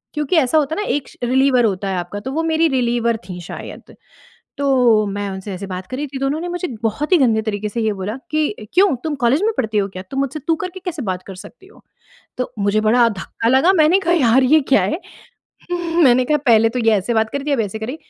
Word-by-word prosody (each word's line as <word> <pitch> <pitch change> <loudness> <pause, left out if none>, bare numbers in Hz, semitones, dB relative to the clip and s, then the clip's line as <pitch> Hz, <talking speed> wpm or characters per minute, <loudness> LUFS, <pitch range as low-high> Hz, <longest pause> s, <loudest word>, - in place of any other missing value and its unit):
क्योंकि 300 +3 -1
ऐसा 300 +1 +3
होता 305 +1 -1
है - - -2
ना, - - -6
एक 290 -2 -2
श - - -19
रिलीवर 255 0 +3
होता 195 -2 -1
है 190 - -2
आपका 175 +3 -5
तो 265 - -5
वो 325 +3 -1
मेरी 325 0 +2
रिलीवर 240 -3 0
थी 180 -1 -6
शायद, 170 - -10 0.6
तो 250 -6 +3
मैं 200 0 -3
उनसे 190 +1 -6
ऐसे 190 +2 -6
बात 185 0 -6
कर 255 - -6
रही 295 +2 -3
थी 270 0 -7
तो 275 - -1
उन्होंने 310 +5 -2
मुझे 355 0 -3 0.2
बहुत 230 - -2
ही - - +7
गंदे 230 -7 +2
तरीके 210 -1 -3
से 230 +2 -3
ये 220 -1 0
बोला 200 +2 -5 0.2
कि, 305 -7 0 0.2
"क्यों 375 -3 +4
तुम 315 -2 -2
कॉलेज 260 +8 +3
में 445 - +2
पढ़ती 220 -4 -1
हो 195 - 0
क्या? 185 - -6
तुम 270 - -2
मुझसे 275 +2 -2
तू 330 - +3
करके 370 0 -6
कैसे 340 -5 -4
बात 185 -3 -3
कर 195 - -8
सकती 380 - -14
हो?" 415 - -20 0.6
तो 250 - -3
मुझे 205 +1 +1
बड़ा 235 +2 +4
धक्का 225 +2 -3
लगा, 285 +9 +4
मैंने 330 +3 +4
कहा, 345 -2 0
"यार 260 -5 +4
ये 300 +5 +5
क्या 270 - +5
है?" 320 - -1 1.1
मैंने 255 -1 +5
कहा, 300 - +2
"पहले 225 -1 +5
तो 250 - -3
ये 225 - +5
ऐसे 210 +4 -1
बात 220 0 +1
कर 280 - -3
थी, 295 - 0
अब 270 - +1
ऐसे 215 0 -3
कर 220 - -4
रही।" 260 - -5
250 Hz, 250 wpm, -19 LUFS, 215-300 Hz, 1.1 s, ही